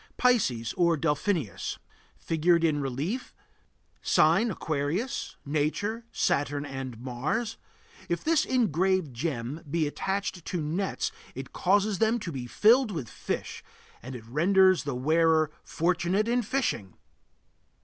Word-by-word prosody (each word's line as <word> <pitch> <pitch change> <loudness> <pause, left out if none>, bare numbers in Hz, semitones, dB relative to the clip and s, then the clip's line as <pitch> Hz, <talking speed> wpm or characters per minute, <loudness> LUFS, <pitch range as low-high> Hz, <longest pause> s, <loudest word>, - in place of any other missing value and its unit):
PISCES 130 - +2
or 170 -2 +3
DELPHINUS. 150 - -1 0.4
Figured 170 +1 +2
in 150 -3 +2
relief 145 - -3 0.3
(?) - - -41
Sign: 235 +1 +4
Aquarius. 160 - -2
Nature: 160 +11 -1
Saturn 145 0 0
and 135 -4 -6
Mars. 155 - -2 0.5
If 170 - -1
this 325 -2 +3
engraved 185 - +1
gem 135 +2 -3
be 160 +1 +1
attached 190 +3 -3
to 180 - -2
nets 165 +6 -2 0.2
it 135 +1 -7
causes 200 +1 +2
them 225 +1 +3
to 175 - -4
be 130 -4 -5
filled 230 - +4
with 160 - -4
fish, - - -5 0.4
and 130 +2 -7
it 115 -2 -9
renders 185 - +4
the 140 -3 -2
wearer 155 +3 +3
fortunate 180 +5 0
in 245 +1 +2
fishing. 225 - -2
165 Hz, 125 wpm, -28 LUFS, 140-200 Hz, 0.5 s, Sign